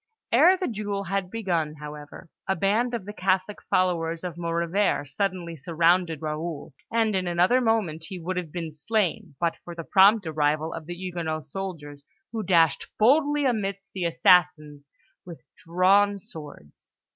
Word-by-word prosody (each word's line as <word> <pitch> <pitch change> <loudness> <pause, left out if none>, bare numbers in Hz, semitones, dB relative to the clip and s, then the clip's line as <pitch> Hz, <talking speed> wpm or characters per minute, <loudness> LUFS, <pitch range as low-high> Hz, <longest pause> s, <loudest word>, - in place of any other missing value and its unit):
Ere 370 +2 +6
the 370 - -2
duel 205 -3 -3
had 195 0 -2
begun, 175 -8 -2
however, 150 +2 -10 0.2
a 190 - +1
band 220 +7 +1
of 220 -5 -6
the 205 - -7
Catholic 190 +1 0
followers 170 -2 0
of 180 -3 -5
Maurevert 170 -1 0
suddenly 175 +2 -3
surrounded 165 +1 +1
Raoul; 155 -1 -5 0.2
and 225 -2 +1
in 185 -1 -1
another 180 +9 +3
moment 205 -9 0
he 190 - -6
would 180 +3 -4
have 175 -4 -4
been 165 -2 -5
slain, 190 +1 -2
but 170 -1 0
for 175 - -9
the 165 - -6
prompt 200 +3 +5
arrival 155 0 0
of 160 -1 -8
the 175 - -5
Huguenot 170 -4 -4
soldiers, 155 -7 -7 0.3
who 225 -1 -3
dashed 170 -5 +2
boldly 290 +5 +3
amidst 200 -5 -2
the 185 -3 -3
assassins 165 -4 +2 0.3
with 165 -8 -11
drawn 195 +4 +3
swords. 150 - -13
180 Hz, 155 wpm, -25 LUFS, 160-200 Hz, 0.3 s, Ere